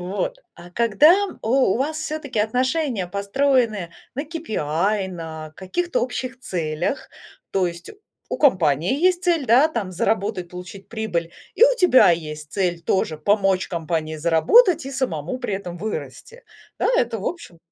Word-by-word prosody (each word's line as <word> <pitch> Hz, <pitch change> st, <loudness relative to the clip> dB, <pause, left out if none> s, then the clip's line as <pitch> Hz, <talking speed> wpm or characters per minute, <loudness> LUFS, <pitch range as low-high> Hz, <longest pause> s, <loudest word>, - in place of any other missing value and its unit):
Вот. 200 Hz, -, -3 dB, 0.2 s
А 175 Hz, +1 st, -13 dB
когда 265 Hz, -, +4 dB, 0.2 s
у -, -, -4 dB, 0.3 s
у -, -, 0 dB
вас 305 Hz, +4 st, -1 dB
всё-таки 310 Hz, -6 st, -4 dB
отношения 250 Hz, -, 0 dB
построены 210 Hz, -1 st, 0 dB, 0.2 s
на 280 Hz, +3 st, -3 dB
KPI, 205 Hz, -, -1 dB
на 160 Hz, -3 st, -7 dB
каких-то 345 Hz, -, -2 dB
общих 255 Hz, +1 st, -4 dB
целях, 170 Hz, -, -3 dB, 0.4 s
то 190 Hz, -2 st, +1 dB
есть 170 Hz, 0 st, -7 dB, 0.4 s
у -, -, -3 dB
компании 180 Hz, -, +2 dB
есть 360 Hz, +2 st, +2 dB
цель, 335 Hz, -6 st, +1 dB
да, 255 Hz, +7 st, +5 dB
там 215 Hz, -11 st, -4 dB
заработать, 195 Hz, 0 st, -1 dB
получить 180 Hz, +2 st, -10 dB
прибыль, 175 Hz, -7 st, -3 dB, 0.2 s
и 470 Hz, -, +6 dB
у -, -, +4 dB
тебя 355 Hz, -, +6 dB
есть 150 Hz, -3 st, -3 dB
цель 180 Hz, -4 st, -1 dB
тоже 160 Hz, -2 st, 0 dB
помочь 195 Hz, +2 st, +1 dB
компании 160 Hz, -2 st, -3 dB
заработать 270 Hz, -, +4 dB
и -, -, -5 dB
самому 250 Hz, -, -3 dB
при 245 Hz, -6 st, -3 dB
этом 180 Hz, -3 st, -6 dB
вырасти, 455 Hz, -, -6 dB, 0.4 s
да. -, -, +1 dB
Это 235 Hz, -2 st, 0 dB
в 195 Hz, -, -6 dB
общем 335 Hz, -, -6 dB
205 Hz, 150 wpm, -22 LUFS, 175-275 Hz, 0.4 s, и